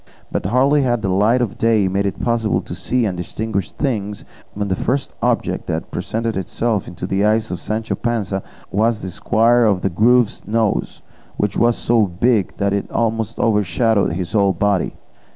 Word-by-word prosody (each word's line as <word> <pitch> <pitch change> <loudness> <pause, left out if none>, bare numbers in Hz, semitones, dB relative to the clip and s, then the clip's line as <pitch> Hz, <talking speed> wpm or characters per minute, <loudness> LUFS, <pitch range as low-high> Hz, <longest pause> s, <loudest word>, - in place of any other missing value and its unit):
But - - -1
hardly 135 +6 +3
had 120 -4 0
the 100 - 0
light 105 +7 +3
of 110 - -5
day 110 -4 +3
made 100 +2 0
it 100 - -4
possible 115 -4 0
to - - -8
see 125 -1 0
and 95 -4 -1
distinguish 100 +1 -3
things, 105 -7 -3 0.3
when 105 0 -2
the 95 - 0
first 135 +7 -2
object - - 0
that - - -3
presented 115 0 -2
itself 105 +3 -1
to 85 - -5
the 95 +2 0
eyes 110 +1 +2
of 90 -1 -4
Sancho 110 +1 -2
Panza 105 -5 -2 0.3
was 110 +2 +1
the 95 - -4
squire 115 +5 +3
of 100 -4 +2
the 100 - +1
Grove's 115 +5 +2
nose, 110 -1 -1 0.3
which 105 - 0
was 120 0 +3
so 115 -3 +2
big 100 +3 +1
that 100 -1 0
it 100 - -2
almost 115 -2 -1
overshadowed 105 -2 +2
his 90 -1 -4
whole 100 -3 +3
body. 100 -2 0
110 Hz, 180 wpm, -19 LUFS, 100-115 Hz, 0.3 s, hardly